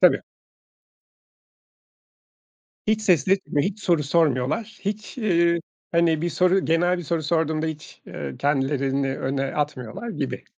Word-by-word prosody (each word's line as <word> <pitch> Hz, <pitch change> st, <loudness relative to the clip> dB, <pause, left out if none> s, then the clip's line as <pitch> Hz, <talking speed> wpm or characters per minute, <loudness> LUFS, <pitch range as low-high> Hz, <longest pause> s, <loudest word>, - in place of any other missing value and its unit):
Tabii. -, -, +5 dB, 2.6 s
Hiç 215 Hz, 0 st, +2 dB
ses 185 Hz, -5 st, +3 dB
etmeyip, 190 Hz, -3 st, +1 dB
hiç 205 Hz, +1 st, -13 dB
soru 170 Hz, -4 st, +2 dB
sormuyorlar. 155 Hz, -, +1 dB
Hiç, 210 Hz, +5 st, -4 dB
iii, 170 Hz, -6 st, +3 dB, 0.3 s
hani, 165 Hz, -2 st, +3 dB
bir 175 Hz, -, 0 dB
soru 185 Hz, +3 st, +3 dB
genel 175 Hz, +3 st, +2 dB
bir -, -, -4 dB
soru 165 Hz, +1 st, -1 dB
sorduğumda 160 Hz, 0 st, 0 dB
hiç, 155 Hz, -2 st, -7 dB
eee, 70 Hz, -2 st, -6 dB
kendilerini 135 Hz, -1 st, 0 dB
öne 135 Hz, +1 st, -1 dB
atmıyorlar 145 Hz, -, -3 dB
gibi. -, -, -4 dB
165 Hz, 125 wpm, -24 LUFS, 140-180 Hz, 2.6 s, Tabii